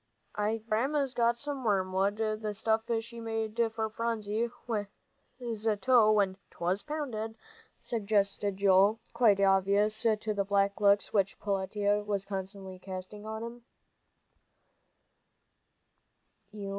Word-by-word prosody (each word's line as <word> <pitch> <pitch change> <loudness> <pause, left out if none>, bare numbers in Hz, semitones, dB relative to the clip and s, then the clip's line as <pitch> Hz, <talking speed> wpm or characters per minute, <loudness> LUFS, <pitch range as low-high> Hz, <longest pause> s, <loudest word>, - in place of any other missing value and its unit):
"I 210 +2 0
guess 220 - -17
Grandma's 265 +5 0
got 235 -1 +2
some 280 +1 -4
wormwood 195 -1 +1
the 215 -1 -2
stuff 220 +1 +1 0.2
she 235 +1 -10
made 225 0 -3
for 220 0 -2
Phronsie's 225 0 -2 1.3
toe 230 -1 +5
when 200 -3 +2
'twas 180 +3 -1
pounded," 250 -8 -4 0.5
suggested 200 -3 0
Joel, 200 +2 +4
quite 215 -5 +4
oblivious 200 +2 +3
to 215 -1 +1
the 200 -1 0
black 200 +1 +1
looks 200 -1 +4
which 195 -2 +1
Peletiah 205 +1 0
was 200 -2 -2
constantly 190 -1 -6
casting 190 +3 -8
on 220 +1 -4
him. 235 +1 -8
210 Hz, 110 wpm, -30 LUFS, 200-225 Hz, 1.3 s, toe